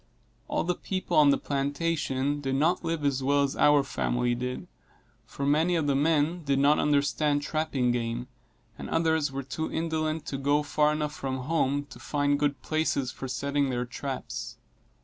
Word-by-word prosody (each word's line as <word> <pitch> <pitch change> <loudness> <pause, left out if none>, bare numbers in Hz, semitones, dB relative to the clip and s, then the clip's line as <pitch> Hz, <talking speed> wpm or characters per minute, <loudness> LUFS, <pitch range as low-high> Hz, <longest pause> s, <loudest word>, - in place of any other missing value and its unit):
All - - 0
the 180 +2 0
people 185 +1 -3
on 150 -2 +7
the 140 - +4
plantation 145 -1 -1
did 135 -1 -1
not 165 +7 +2
live 165 -3 -2
as 135 -2 +1
well 140 +2 +3
as 140 - -1
our 145 -1 +5
family 125 -2 0
did, 125 +1 -4 0.6
for 140 - -4
many 160 +5 +3
of 160 -3 +1
the 140 - +2
men 160 +3 +1
did 140 -2 +1
not 145 +2 +4
understand 145 0 +1
trapping 150 -5 0
game, 120 0 -2 0.5
and - - -6
others 160 -3 +1
were 135 0 -4
too 160 +4 -4
indolent 160 -1 -1
to 135 - -4
go 145 +2 +2
far 150 +1 +2
enough 150 -1 -2
from 130 -3 -4
home 145 -1 0
to - - -11
find 145 -1 0
good 145 -1 -1
places 155 -5 0
for 135 - -7
setting 140 +2 -1
their 125 -1 -1
traps. 135 +2 -6
145 Hz, 175 wpm, -28 LUFS, 135-155 Hz, 0.6 s, on